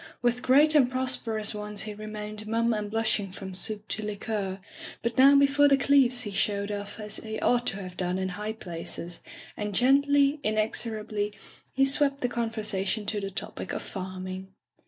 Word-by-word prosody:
With 245 0 +1
great 290 +5 +5
and 275 -5 +5
prosperous 235 -5 +1
ones 210 -1 -2
he 215 0 -6
re 215 +1 -8
mained 215 0 -6
mum 230 +1 +1
and 210 -1 -3
blushing 215 -3 0
from 190 -1 -8
soup 210 +3 -1
to 215 - -3
liqueur; 205 -2 -3 0.4
but 235 0 -1
now 275 +3 +7
before 280 +1 +5
the 275 -1 +5
Cleeves 260 -3 +4
he 205 - -5
showed 200 +1 0
off 205 +1 -5
as 210 -1 -4
he 220 0 -5
ought 245 0 +2
to 195 - -1
have 180 -1 -9
done 180 0 -1
in 190 0 -2
high 210 +4 -4
places, 170 -3 -5 0.4
and 210 -1 -4
gendy, 280 +3 +4
inexorably, 215 -1 -1 0.4
he 270 +1 +4
swept 275 0 +2
the 245 - +1
conversation 215 -3 -1
to 205 0 -1
the 195 - -3
topic 195 - -6
of - - -4
farming. 185 0 -6
215 Hz, 180 wpm, -27 LUFS, 200-245 Hz, 0.4 s, now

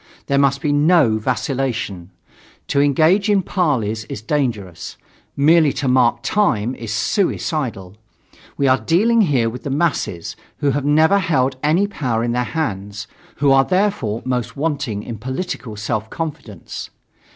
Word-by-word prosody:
There 140 0 +1
must 140 -1 +2
be 145 -2 +1
no 145 -7 +4
vacillation. 120 -7 -2 0.6
To 140 - +2
engage 160 +9 +3
in 200 -2 +3
parleys 120 - 0
is - - -6
dangerous; 115 - -3 0.4
merely 155 +1 +5
to 140 0 -2
mark 120 -2 +3
time 125 - +1
is 115 -4 -7
suicidal. 115 - -1 0.6
We 140 - +2
are 130 0 +4
dealing 225 +8 +3
here 135 - +2
with 120 +2 -5
the - - -5
masses, 135 - -1 0.2
who 145 - +1
have 140 +1 -2
never 160 +7 +4
held 135 -8 +1
any 160 +7 +2
power 125 - -2
in 120 - 0
their 125 +1 0
hands, 105 -6 -4 0.3
who 140 -1 +2
are 135 0 +6
therefore 185 - 0
most 125 -2 -2
wanting 135 -9 -2
in 115 -2 -7
political 130 -2 -5
self 110 +1 -3
confidence. 150 - -6
135 Hz, 145 wpm, -19 LUFS, 115-155 Hz, 0.6 s, are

